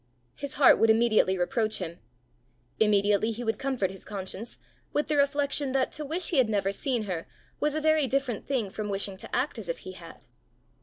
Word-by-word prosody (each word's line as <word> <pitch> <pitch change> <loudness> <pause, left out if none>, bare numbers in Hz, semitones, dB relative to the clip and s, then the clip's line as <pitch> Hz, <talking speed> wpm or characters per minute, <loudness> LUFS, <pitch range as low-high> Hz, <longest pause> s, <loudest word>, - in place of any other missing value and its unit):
His 280 -1 -6
heart 280 - +6
would 225 - +4
immediately 220 -4 +4
reproach 215 +4 0
him; 170 -2 -6 0.8
immediately 210 0 +3
he 230 +2 -4
would 225 -2 -1
comfort 255 -9 -1
his 190 - -11
conscience 200 +2 -5 0.4
with 295 - 0
the 305 - +2
reflection 280 -1 +1
that 265 -1 +1
to 305 - -4
wish 325 +5 -2
he 320 - +3
had 245 -4 +3
never 200 -2 +1
seen 240 +2 0
her 180 -5 -4 0.3
was 300 0 0
a 310 - -1
very 310 -2 +3
different 260 -4 -1
thing 240 -8 -1
from 210 0 -4
wishing 195 0 -1
to 225 +3 -6
act 255 -1 -1
as 195 -6 -7
if 170 - -1
he 185 - -6
had. 170 -3 -13
225 Hz, 200 wpm, -28 LUFS, 200-275 Hz, 0.8 s, heart